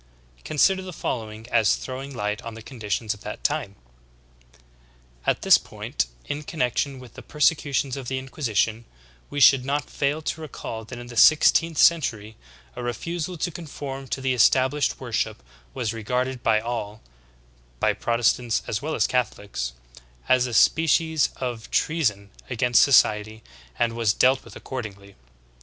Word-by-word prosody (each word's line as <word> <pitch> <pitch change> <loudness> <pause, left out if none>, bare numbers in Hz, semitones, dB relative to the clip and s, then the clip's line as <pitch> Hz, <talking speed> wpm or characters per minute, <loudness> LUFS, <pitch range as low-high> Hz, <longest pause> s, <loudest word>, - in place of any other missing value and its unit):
Consider 190 +6 +2
the 185 -1 -8
following 110 -6 -5
as 105 - +4
throwing 135 +2 -7
light 105 -4 -3
on 115 -1 -8
the 115 - -10
conditions 110 -3 -3
of 105 - -15
that 105 - -7
time: 145 -10 -1 1.5
"x\t - - +2
this - - +7
point, - - -4 0.2
in 145 - -4
con 155 +2 -9
nection 130 +3 0
with 125 -3 -13
the - - -10
persecutions 145 -3 +1
of 135 -3 -7
the 130 - -2
Inquisition, 115 -4 -1 0.4
we 145 - -3
should 135 -2 +7
not 145 +2 -2
fail 145 +3 -1
to 160 - -3
recall 115 -7 -7
that 120 +2 -9
in 120 - -8
the 120 0 -10
sixteenth 155 +5 +5
century 110 -11 +2 0.4
a - - -6
refusal 165 +9 -4
to 175 - -2
conform 140 -5 -7
to 135 - -3
the 130 -1 +1
established 130 +3 +3
worship 115 - -3 0.3
was 115 -2 -2
regarded 125 +3 -2
by 110 -2 +3
all, 110 -2 -5 0.8
by - - +2
Protestants 120 0 +1
as 105 - -3
well 155 +2 -3
as - - +2
Catholics, 100 - -2 0.5
as 125 0 +3
a 120 - -6
species 160 +4 +3
of 120 -4 -5
treason 105 -12 0 0.2
against 125 -1 +3
society 110 -4 +3 0.3
and 120 -1 +1
was 115 -2 +1
dealt 130 +1 +3
with - - -14
accordingly. 100 -6 -7
125 Hz, 150 wpm, -24 LUFS, 110-145 Hz, 1.5 s, this